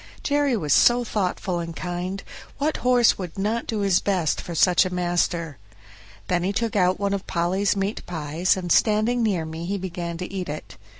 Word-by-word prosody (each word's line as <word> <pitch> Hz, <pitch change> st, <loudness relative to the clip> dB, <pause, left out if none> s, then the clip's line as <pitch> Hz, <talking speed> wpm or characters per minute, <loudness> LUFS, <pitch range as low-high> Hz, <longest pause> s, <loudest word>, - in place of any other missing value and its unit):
Jerry 285 Hz, -4 st, +2 dB
was 150 Hz, -7 st, +1 dB
so 245 Hz, 0 st, +5 dB
thoughtful 185 Hz, -4 st, -2 dB
and 170 Hz, -1 st, -5 dB
kind 180 Hz, +3 st, -4 dB, 0.3 s
what 300 Hz, +2 st, 0 dB
horse 245 Hz, -3 st, +3 dB
would 180 Hz, -2 st, -6 dB
not 215 Hz, +4 st, -1 dB
do 220 Hz, -2 st, -2 dB
his 195 Hz, -3 st, +3 dB
best 185 Hz, -6 st, 0 dB
for 170 Hz, -, -7 dB
such 180 Hz, +2 st, +5 dB
a 185 Hz, -, -2 dB
master? 175 Hz, -, -1 dB, 0.7 s
Then 175 Hz, -1 st, +1 dB
he 185 Hz, +3 st, 0 dB
took 225 Hz, +1 st, -2 dB
out 185 Hz, -2 st, +3 dB
one 200 Hz, -1 st, 0 dB
of 195 Hz, -1 st, -4 dB
Polly's 185 Hz, +4 st, +1 dB
meat 195 Hz, +2 st, -2 dB
pies, 160 Hz, +2 st, 0 dB
and 175 Hz, -2 st, -4 dB
standing 220 Hz, +5 st, +3 dB
near 195 Hz, -8 st, 0 dB
me, 160 Hz, +1 st, -6 dB
he 200 Hz, +2 st, -1 dB
began 170 Hz, -2 st, -5 dB
to 180 Hz, +2 st, -6 dB
eat 185 Hz, -4 st, -4 dB
it. 150 Hz, +1 st, -7 dB
185 Hz, 190 wpm, -24 LUFS, 175-210 Hz, 0.7 s, so